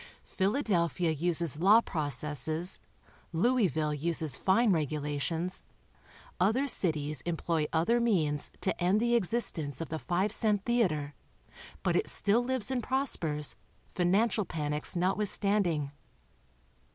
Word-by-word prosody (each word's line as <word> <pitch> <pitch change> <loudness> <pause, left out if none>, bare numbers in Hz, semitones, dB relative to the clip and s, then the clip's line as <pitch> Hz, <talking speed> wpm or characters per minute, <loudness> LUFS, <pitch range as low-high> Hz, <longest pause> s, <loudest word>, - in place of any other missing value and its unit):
Philadelphia 190 - 0
uses 165 -1 +2
law 200 +6 +6
processes, 155 - -1 0.5
Louisville 175 -6 +1
uses 155 -2 0
fine 205 - +2
regulations, 155 +2 -2 0.8
other 250 +8 +2
cities 155 - +1
employ 165 -2 -1
other 175 +9 +2
means 160 -11 0
to 190 - +1
end 190 +4 +3
the 235 +1 +1
existence 185 - -1
of 165 - -5
the 160 - -4
five 185 +5 -1
cent 210 -2 +1
theater, 170 -12 0 0.7
but - - +1
it - - +1
still 220 +4 +2
lives 260 -2 -2
and 255 -2 -1
pros 265 +4 0
pers, 150 -2 -2 0.4
financial 205 +5 +1
panics 150 -3 -3
notwithstanding. 185 -4 +1
175 Hz, 115 wpm, -30 LUFS, 155-210 Hz, 0.8 s, law